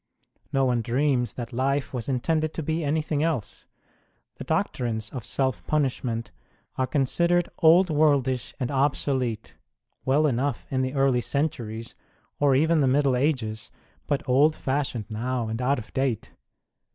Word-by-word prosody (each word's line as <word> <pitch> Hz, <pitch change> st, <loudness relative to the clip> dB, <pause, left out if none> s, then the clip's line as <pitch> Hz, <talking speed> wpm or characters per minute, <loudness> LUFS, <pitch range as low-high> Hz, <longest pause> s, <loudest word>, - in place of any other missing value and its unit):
No 135 Hz, -2 st, +2 dB
one 125 Hz, -2 st, +1 dB
dreams 125 Hz, +1 st, +1 dB
that 120 Hz, -2 st, -6 dB
life 135 Hz, +3 st, 0 dB
was 125 Hz, 0 st, -4 dB
in 130 Hz, -2 st, 0 dB
tended 155 Hz, 0 st, 0 dB
to 160 Hz, -, -3 dB
be 160 Hz, +2 st, -1 dB
anything 150 Hz, 0 st, 0 dB
rise. 155 Hz, -9 st, -2 dB, 0.7 s
The -, -, -6 dB
doctrines 110 Hz, -3 st, -2 dB
of 125 Hz, -4 st, -6 dB
self 130 Hz, +1 st, -1 dB
punishment 125 Hz, -6 st, -1 dB, 0.4 s
are 130 Hz, -, 0 dB
considered 170 Hz, +6 st, +2 dB
old 170 Hz, +2 st, +6 dB
worldish 140 Hz, -4 st, +2 dB
and 125 Hz, -1 st, -2 dB
obsolete; 130 Hz, -4 st, 0 dB, 0.5 s
well 145 Hz, +4 st, +3 dB
enough 135 Hz, -1 st, 0 dB
in 130 Hz, -1 st, +1 dB
the 130 Hz, +2 st, -2 dB
early 135 Hz, -3 st, +3 dB
centuries, 115 Hz, -6 st, -3 dB, 0.5 s
or 140 Hz, -2 st, +4 dB
even 160 Hz, +4 st, +3 dB
the; 135 Hz, -, +3 dB
Middle 140 Hz, +1 st, +3 dB
1 125 Hz, 0 st, +1 dB
Ages, 110 Hz, -7 st, -1 dB, 0.4 s
but 145 Hz, -1 st, -1 dB
old 145 Hz, +5 st, +4 dB
fnshioned 130 Hz, -5 st, -2 dB
now 120 Hz, +2 st, -2 dB
and 110 Hz, +2 st, -3 dB
out 135 Hz, +3 st, +2 dB
of 110 Hz, -, -9 dB
date 130 Hz, -5 st, -1 dB
1 -, -, -32 dB
135 Hz, 155 wpm, -26 LUFS, 120-145 Hz, 0.7 s, old